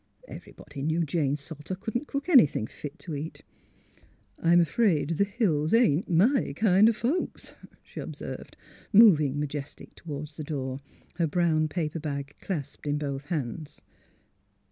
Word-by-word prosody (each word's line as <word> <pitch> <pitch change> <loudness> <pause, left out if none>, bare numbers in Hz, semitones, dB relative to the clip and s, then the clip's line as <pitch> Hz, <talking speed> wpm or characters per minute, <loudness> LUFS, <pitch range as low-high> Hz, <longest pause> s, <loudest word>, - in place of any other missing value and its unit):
Everybody 140 - -10
knew 160 +3 0
Jane 145 -2 0
Salter 150 +4 -7
couldn't 230 +9 -4
cook 280 +2 -4
anything 245 - +5
fit 145 +5 -9
to 165 - -8
eat. 150 +3 -6 0.5
'* - - -33
I'm 170 +1 +5
afraid 170 -2 +2
the 165 +4 +2
Hills 200 - +1
ain't 205 -8 +3
my 195 - +3
kind 205 +2 +5
o' - - +4
folks," 245 +10 -3 0.3
she - - -10
observed, - - -7 0.3
moving 155 - +6
majestic 145 -1 -6
toward 150 -2 -7
the 155 +1 -8
door, 135 -3 -4 0.4
her 170 -2 +2
brown 155 -1 +2
paper 160 0 -3
bag 140 -2 -5
clasped 150 -5 -5
in 145 0 +1
both 140 -1 -4
hands. 150 -2 -4
160 Hz, 145 wpm, -27 LUFS, 145-195 Hz, 0.5 s, moving